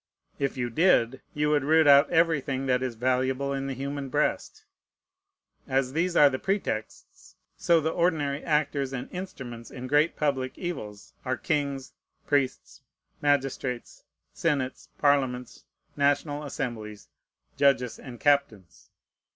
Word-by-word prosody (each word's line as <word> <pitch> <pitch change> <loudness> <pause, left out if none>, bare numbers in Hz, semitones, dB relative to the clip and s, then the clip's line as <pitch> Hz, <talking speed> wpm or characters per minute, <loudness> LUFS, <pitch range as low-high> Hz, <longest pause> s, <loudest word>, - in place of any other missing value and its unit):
If 140 -1 -1
you 120 -1 -2
did, 135 -4 +3
you 150 0 +1
would 145 -2 +2
root 160 +2 +4
out 140 0 +7
everything 145 -5 +1
that 125 -1 +1
is 130 -2 -3
valuable 130 +3 0
in 135 0 -3
the 135 - -3
human 140 +1 -4
breast. - - -1 1.0
As 130 -1 0
these 175 +3 0
are 145 - +8
the 130 -2 -1
pretexts, 190 - -4 0.2
so 170 -1 +3
the 160 +1 -1
ordinary 155 -5 0
actors 145 -3 0
and 125 -2 -5
instruments 130 -11 -7
in 125 -1 -8
great 145 +5 +2
public 135 -4 -1
evils 110 - -6
are 130 -2 -1
kings, 140 +1 -2 0.3
priests, 140 -3 -1 0.4
magistrates, 135 -3 -1 0.3
senates, 140 -5 -2
parliaments, 130 -4 0 0.3
national 145 +1 +1
assemblies, 110 -6 -5 0.5
judges, 135 -4 +2
and 120 -3 -10
captains. 115 - 0
140 Hz, 125 wpm, -27 LUFS, 130-145 Hz, 1.0 s, are